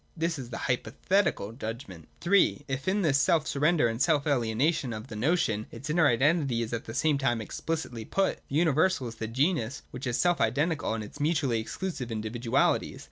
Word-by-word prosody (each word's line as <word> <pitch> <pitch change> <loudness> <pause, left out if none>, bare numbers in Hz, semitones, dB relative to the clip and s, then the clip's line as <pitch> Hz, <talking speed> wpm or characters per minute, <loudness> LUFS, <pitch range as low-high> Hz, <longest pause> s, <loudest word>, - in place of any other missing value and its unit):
This 165 -1 -1
is 125 -3 -7
the 120 - -5
Hypothetical 155 - 0
judgment. 110 - -7
(3) 180 -5 +3
If, 135 +3 -4
in 200 +2 +1
this 140 -4 +3
self 155 +2 +3
surrender 150 -1 +2
and 115 +2 -3
self 150 -3 +3
alienation 130 0 +1
of 110 +3 -7
the 110 - -7
notion, 110 -4 0
its 145 +3 -6
inner 160 -1 +4
identity 135 -1 +2
is 115 - -6
at 115 - -3
the 115 - -7
same 150 -3 +2
time 120 -4 +1
explicitly 120 +1 -4
put, 195 - 0
the 135 - -4
universal 160 -2 +2
is 115 - -6
the 110 - -4
genus 140 +1 0
which 125 +1 -6
is 120 - 0
selfidentical 150 -4 +1
in 110 - -4
its 105 +8 -11
mutuallj' 145 -6 +1
exclusive 130 -1 -5
individualities. 115 +2 0
135 Hz, 185 wpm, -28 LUFS, 115-160 Hz, -, inner